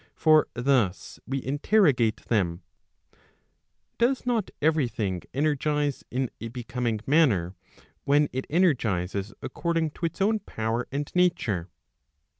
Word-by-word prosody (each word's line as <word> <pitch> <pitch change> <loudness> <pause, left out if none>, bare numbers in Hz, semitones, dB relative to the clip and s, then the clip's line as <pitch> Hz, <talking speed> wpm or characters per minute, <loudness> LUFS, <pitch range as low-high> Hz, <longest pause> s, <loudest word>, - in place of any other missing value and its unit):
For 155 -1 +4
thus 120 - 0
we 135 0 -2
interrogate 140 - +2
them: 90 -6 0 1.4
does 250 +3 +2
not 235 -5 0
every 155 -2 +2
thing 95 -6 -3
energize 150 0 0
in 130 0 -2
a 115 - -4
becoming 120 -2 -3
manner 120 - +3 0.5
when 145 +1 +3
it 130 +1 -3
energizes 110 - +1
according 165 -2 -1
to 170 - -2
its - - -10
own 215 +3 +2
power 115 - -3
and 145 +2 -3
nature 120 - +1
135 Hz, 115 wpm, -26 LUFS, 110-160 Hz, 1.4 s, For